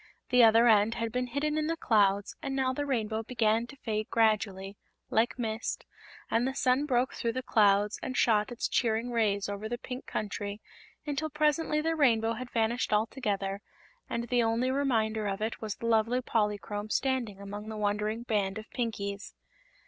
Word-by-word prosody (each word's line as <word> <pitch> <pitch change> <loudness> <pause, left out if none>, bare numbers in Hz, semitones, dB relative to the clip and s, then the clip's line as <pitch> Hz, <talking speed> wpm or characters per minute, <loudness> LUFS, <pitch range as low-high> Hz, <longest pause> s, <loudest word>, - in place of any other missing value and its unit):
The 250 -1 +6
other 230 +1 +6
end 220 0 +4
had 230 -1 -2
been 250 +1 -1
hidden 300 +4 -1
in 305 - -1
the 330 0 -1
clouds 205 -6 +2
and 270 - -3
now 260 -1 +1
the 290 +2 -3
Rainbow 220 -4 -1
began 225 0 +1
to 275 - -12
fade 215 -5 -3
gradually, 205 -3 +1 0.4
like 230 +3 +2
mist, 225 -2 -3 0.5
and 235 +3 +2
the 265 - -3
sun 270 +2 +2
broke 250 -1 +1
through 230 -1 -2
the 255 +1 -3
clouds 205 -2 +3
and 255 - -4
shot 215 -1 +3
its 240 - -2
cheering 230 0 0
rays 210 -4 +1
over 205 +2 -5
the 240 - -2
Pink 250 +1 -7
Country 205 0 -4 0.5
until 300 +1 -2
presently 300 +1 +1
the 325 +1 0
Rainbow 230 -6 +3
had 245 +2 -6
vanished 235 +2 0
altogether 210 -3 -1 0.5
and 235 0 -3
the 245 -1 +3
only 230 +3 +1
reminder 220 -6 0
of 195 0 -2
it 220 +1 -3
was 215 -2 -3
the - - -8
lovely 230 +2 +2
Polychrome 210 -2 -2
standing 245 -6 -1
among 205 +2 -7
the 220 - -5
wondering 210 +2 -1
band 205 -4 -1
of 215 0 -8
Pinkies. 200 -4 -4
225 Hz, 180 wpm, -29 LUFS, 210-250 Hz, 0.5 s, The